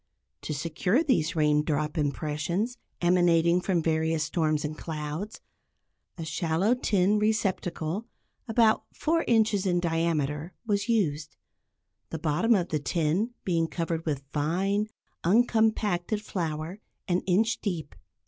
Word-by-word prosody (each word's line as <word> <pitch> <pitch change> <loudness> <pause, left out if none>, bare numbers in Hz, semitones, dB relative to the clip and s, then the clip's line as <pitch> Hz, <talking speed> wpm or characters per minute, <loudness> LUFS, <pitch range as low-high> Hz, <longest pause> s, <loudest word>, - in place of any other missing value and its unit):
To - - -5
secure 175 - +1
these 175 - +1
raindrop 150 0 +1
impressions, 155 - -1 0.2
emanating 175 -1 +4
from 180 -3 0
various 160 0 +1
storms 155 -2 0
and 150 +1 -4
clouds, 155 +6 -5 0.8
a 165 - -5
shallow 165 +6 +1
tin 210 -4 +2
receptacle 200 -2 -1 0.4
about 225 -1 +3
four 330 +1 0
inches 215 -4 +3
in 175 -1 +2
diameter 165 -1 -1
was 205 +1 0
used, 155 -10 0 0.7
the 160 - -4
bottom 160 +10 +2
of 180 -3 0
the 155 - 0
tin 170 - 0
being 165 -3 +1
covered 165 -1 -3
with 140 -3 -1
fine, 190 +8 0 0.4
uncompacted 215 -1 +2
flour 165 -1 -4 0.3
an 180 -1 +1
inch 220 +5 +2
deep. 170 -8 -3
175 Hz, 120 wpm, -27 LUFS, 155-205 Hz, 0.8 s, emanating